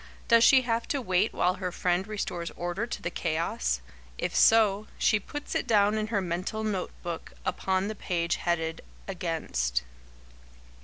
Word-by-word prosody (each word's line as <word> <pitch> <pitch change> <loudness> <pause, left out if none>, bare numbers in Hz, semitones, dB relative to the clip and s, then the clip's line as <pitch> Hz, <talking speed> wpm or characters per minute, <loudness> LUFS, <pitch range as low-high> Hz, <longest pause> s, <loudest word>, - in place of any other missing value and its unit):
Does 230 -1 +6
she 265 0 +7
have 230 -1 -1
to 285 - 0
wait 185 -3 +1
while 180 +1 +2
her 185 -1 -4
friend 180 +2 0
restores 180 -5 -3
order 175 +6 -3
to - - -5
the 175 - -2
chaos? 155 - -1 0.4
If - - -2
so, 215 -2 +5
she 215 - +3
puts 295 +8 -6
it - - -1
down 210 -1 +4
in 215 - -2
her 210 -3 0
mental 185 +5 -3
note 205 -4 -1
book, 170 -2 -5
upon 190 +1 0
the 215 - -3
page 175 -4 -1
headed 165 -2 -1 0.3
"Against." - - -1
190 Hz, 160 wpm, -28 LUFS, 170-215 Hz, 0.4 s, she